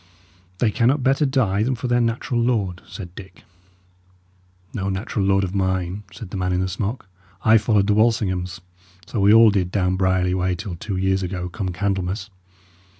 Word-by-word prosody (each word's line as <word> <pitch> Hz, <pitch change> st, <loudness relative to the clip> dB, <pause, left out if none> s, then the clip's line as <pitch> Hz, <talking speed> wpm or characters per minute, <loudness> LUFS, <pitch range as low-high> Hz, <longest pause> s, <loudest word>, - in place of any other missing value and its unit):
"They 110 Hz, +1 st, +2 dB
cannot 130 Hz, +5 st, +2 dB
better 135 Hz, +3 st, +3 dB
die 115 Hz, -7 st, +1 dB
than 130 Hz, +4 st, +1 dB
for 125 Hz, +2 st, -4 dB
their 120 Hz, 0 st, +2 dB
natural 120 Hz, +1 st, -1 dB
lord," 105 Hz, -7 st, 0 dB
said 90 Hz, -5 st, -9 dB
Dick. 95 Hz, 0 st, -12 dB, 1.3 s
"No 100 Hz, -3 st, -2 dB
natural 95 Hz, +1 st, -2 dB
lord 95 Hz, 0 st, +3 dB
of 95 Hz, 0 st, -3 dB
mine," 95 Hz, 0 st, -1 dB
said 105 Hz, -5 st, -10 dB
the 100 Hz, -, -4 dB
man 90 Hz, 0 st, -1 dB
in 90 Hz, -, +1 dB
the 95 Hz, -, 0 dB
smock. 100 Hz, +5 st, -3 dB, 0.4 s
"I 110 Hz, 0 st, +6 dB
followed 105 Hz, -2 st, +2 dB
the 105 Hz, -, +2 dB
Walsinghams; 95 Hz, -5 st, +1 dB, 0.4 s
so 115 Hz, -, -4 dB
we 100 Hz, +1 st, +5 dB
all 115 Hz, 0 st, +7 dB
did 95 Hz, -3 st, 0 dB
down 95 Hz, -2 st, +1 dB
Brierly 95 Hz, -1 st, +1 dB
way, 90 Hz, 0 st, 0 dB
till 90 Hz, 0 st, -6 dB
two 95 Hz, +2 st, -4 dB
years 95 Hz, +1 st, +1 dB
ago, 90 Hz, -1 st, -4 dB
come 95 Hz, +1 st, -4 dB
Candlemas. 95 Hz, +2 st, -2 dB
95 Hz, 180 wpm, -22 LUFS, 95-110 Hz, 1.3 s, all